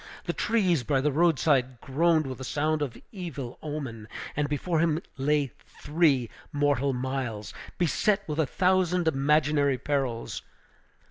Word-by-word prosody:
The - - -1
trees 185 - +2
by 135 +3 +1
the 145 +2 +1
road 165 +1 +3
side 130 -5 +2
groaned 155 +4 +2
with 130 -1 -6
a - - -5
sound 150 +4 0
of 135 -5 -3
evil 155 - -6
omen; 135 -8 -5 0.3
and 145 0 0
before 160 +3 0
him 160 -1 +2 0.2
lay 145 -1 +1 0.3
three 145 -5 +2 0.2
mortal 145 -2 +2
miles, 125 -4 -3 0.2
beset 195 +4 +1
with 155 0 -3
a 155 - +2
thousand 180 0 +2
imaginary 145 -1 +3
perils. 130 -4 -2
145 Hz, 140 wpm, -27 LUFS, 130-160 Hz, 0.3 s, road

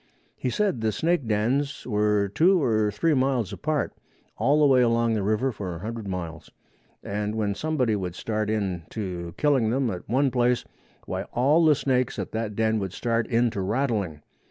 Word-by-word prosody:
He 125 - -2
said 195 - 0
the 110 -1 +1
snake 165 -1 0
dens 120 +7 0
were 105 -3 +1
two 175 - +4
or 110 -7 +2
three 155 +10 +1
miles 130 -6 +1
apart, 155 -1 -1 0.4
all 140 +7 +2
the 150 - +5
way 130 -3 +5
along 115 -1 +2
the 110 - 0
river 110 +6 +1
for 95 -6 -5
a - - -7
hundred 110 0 -5
miles, 85 -4 -5 0.5
and 105 +1 -3
when 105 -2 0
somebody 130 -4 0
would 90 -3 -4
start 110 +1 -2
in 100 -5 -1
to 90 -5 -5
killing 135 -7 +2
them 125 0 +1
at 90 0 -7
one 135 +3 +2
place, 125 0 +1 0.4
why - - -3
all 145 +7 +3
the 155 -2 +6
snakes 130 -3 0
at - - -4
that 110 -2 -3
den 110 0 +1
would 95 -2 -4
start 115 0 -1
in 120 0 +2
to 100 - -3
rattling. 100 - -1
115 Hz, 185 wpm, -25 LUFS, 105-130 Hz, 0.5 s, the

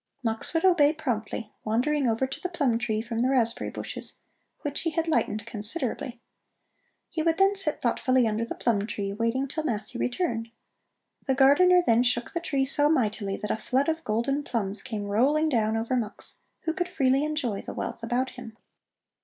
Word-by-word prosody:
Mux 225 -1 -1
would 325 - +2
obey 310 -5 +5
promptly, 230 -7 -3
wandering 260 +6 +1
over 230 +3 +1
to 265 - -6
the 360 - -2
plum 280 -10 +1
tree 220 -2 -1
from 230 -1 -3
the 255 - +2
raspberry 235 -4 +1
bushes, - - -3 0.5
which 290 -1 -3
he 330 - 0
had 330 +1 -1
lightened 215 -9 0
considerably. 235 +2 -2 0.9
He 320 - -1
then 335 +4 +4
would 400 - -4
sit 320 -6 +1
thoughtfully 255 +1 +2
under 220 +1 0
the 230 - -4
plum 210 -4 0
tree, 200 -2 -3
waiting 230 +5 0
till 315 +3 -3
Matthew 235 -3 -3
returned. 245 -4 -1 0.8
The 265 - +2
gardener 355 +7 +6
then 230 -2 +4
shook 245 -1 0
the 340 - 0
tree 280 -6 0
so 290 +2 +2
mightily 215 -8 0
that 210 - -3
a - - 0
flood 260 +6 0
of 320 +1 -2
golden 235 +6 0
plums 215 -7 -2
came 215 -5 -4
rolling 275 +10 +2
down 225 -4 +1
over 230 +3 -1
Mux, 225 -4 -4 0.2
who 320 - -1
could 355 0 -1
freely 270 -4 +2
enjoy 290 -9 -1
the - - -8
wealth - - -4
about 245 +3 -1
him. 240 -3 -10
250 Hz, 185 wpm, -27 LUFS, 225-300 Hz, 0.9 s, gardener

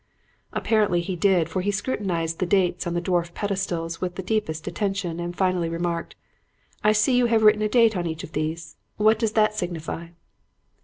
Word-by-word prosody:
"Apparently 210 -6 +2
he 180 +2 -3
did, 175 -2 +3
for 185 +2 -2
he 200 - -1
scrutinized 185 -6 -2
the 185 - 0
dates 185 -2 +1
on 175 - -2
the 175 - 0
dwarf 175 -1 -1
pedestals 185 -5 -2
with 180 -1 -3
the 190 - -5
deepest 175 -6 -2
attention 195 -5 -2
and 175 0 -5
finally 185 -3 +1
remarked, 170 0 -3 0.7
'I 210 - +5
see 215 +4 +3
you 245 -1 +4
have 225 -1 +2
written 210 0 +6
a 215 - +1
date 230 -1 +4
on 175 -2 -1
each 160 0 -5
of - - -9
these. 155 +1 -4 0.2
What 215 +1 +4
does 225 -2 0
that 215 -1 +3
signify?' 170 -3 -4
185 Hz, 190 wpm, -24 LUFS, 170-210 Hz, 0.7 s, written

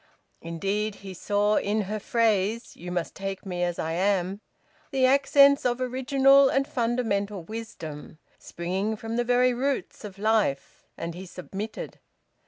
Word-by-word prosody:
Indeed 200 +5 -2
he 190 - -6
saw 205 +3 +1
in 210 +2 0
her 210 +2 -3
phrase, 225 0 0
"You 180 +1 -8
must 175 -2 -2
take 195 0 -5
me 180 -2 -4
as 175 -1 0
I 160 - -2
am," 190 +2 0 0.5
the 265 -3 +2
accents 280 +1 +5
of 245 0 0
original 270 +2 +4
and 275 +1 +1
fundamental 225 -6 -1
wisdom, 165 -8 -8 0.2
springing 190 +5 -3
from 225 +1 -5
the 240 - +1
very 250 +1 +3
roots 265 +1 -2
of 200 -2 -8
life. 215 -9 0
And 170 0 -4
he 185 +2 -9
submitted. 195 +5 -7
210 Hz, 145 wpm, -26 LUFS, 185-245 Hz, 0.5 s, accents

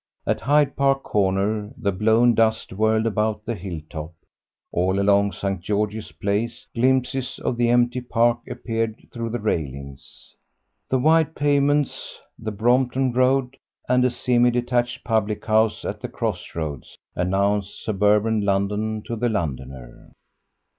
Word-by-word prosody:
At - - 0
Hyde 145 -1 +3
Park 135 -1 +2
Corner 105 +2 0
the 105 -5 0
blown 110 +5 +3
dust 110 -3 +1
whirled 110 +2 +2
about 105 -1 -1
the 120 - -2
hill 90 -5 -6
top; 80 +1 -7 0.6
all 95 +2 +1
along 100 0 +3
St. 95 0 -3
George's 105 +3 -2
Place 115 +4 -2
glimpses 130 +1 0
of - - -2
the 120 0 +1
empty 120 +1 +2
Park 120 -1 +2
appeared 115 -1 -3
through 115 -1 -4
the 120 - -2
railings. 70 -9 -5 0.6
The 130 - +2
wide 160 +3 +3
pavements, 145 0 +1 0.2
the 110 -1 -4
Brompton 125 +4 +1
Road, 130 +1 +2 0.3
and 125 0 +3
a 125 - +4
semi 120 0 +2
detached 120 0 -1
public 110 -2 -1
house 110 0 +2
at - - -4
the - - -5
cross - - -4
roads, 75 -5 -5 0.2
announced 100 +2 0
suburban 105 +1 +2
London 105 +2 -1
to 120 - -4
the 120 +2 0
Londoner. 65 - -5
110 Hz, 140 wpm, -23 LUFS, 100-125 Hz, 0.6 s, a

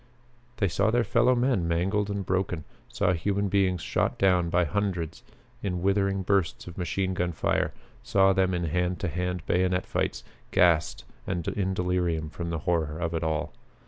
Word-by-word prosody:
They 105 -4 +2
saw 100 +4 +1
their 120 +1 +2
fellow 120 +2 +3
men 120 -8 +1
mangled 95 +5 0
and 100 -1 -3
broken; 90 -3 -1 0.2
saw 90 - +1
human 100 +4 0
beings 95 -3 +2
shot - - 0
down 90 -3 +3
by 90 +1 +2
hundreds 85 -2 -2 0.4
in 90 -3 -2
withering 100 0 +1
bursts 95 -3 0
of 85 - -9
machine 95 +1 -1
gun 90 -2 -1
fire; - - 0 0.3
saw 95 0 +3
them 95 -1 +2
in 85 - -1
hand 90 +2 0
to 95 - 0
hand 90 +1 -3
bayonet 90 +1 +1
fights; - - -2 0.3
gassed 80 -4 +2 0.2
and 90 -3 -2
in 95 -2 -1
delirium 90 -4 -1
from 85 0 -5
the 85 - -2
horror 80 -3 0
of 85 0 -2
it 80 - -1
all. 80 -1 -1
90 Hz, 175 wpm, -27 LUFS, 85-100 Hz, 0.4 s, fellow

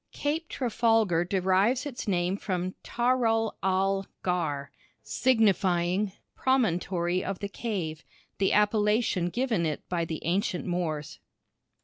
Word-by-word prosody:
Cape 310 +3 -2
Trafalgar 225 -8 +2
derives 195 - +2
its 250 -5 -6
name 180 -1 +1
from 185 -2 -3
Taral 235 -2 +1
al 195 +1 +1 0.2
ghar 155 -6 -1 0.3
signifying 190 - +2 0.2
"promontory 180 -8 +1
of 195 -1 -3
the 200 - -4
cave" 190 -7 -4 0.4
the 195 - +2
appellation 210 -3 +2
given 235 -4 0
it 155 -2 -3
by 175 -2 0
the 160 -1 -5
ancient 180 +1 0
Moors. 165 -5 -3
195 Hz, 110 wpm, -28 LUFS, 175-225 Hz, 0.4 s, Trafalgar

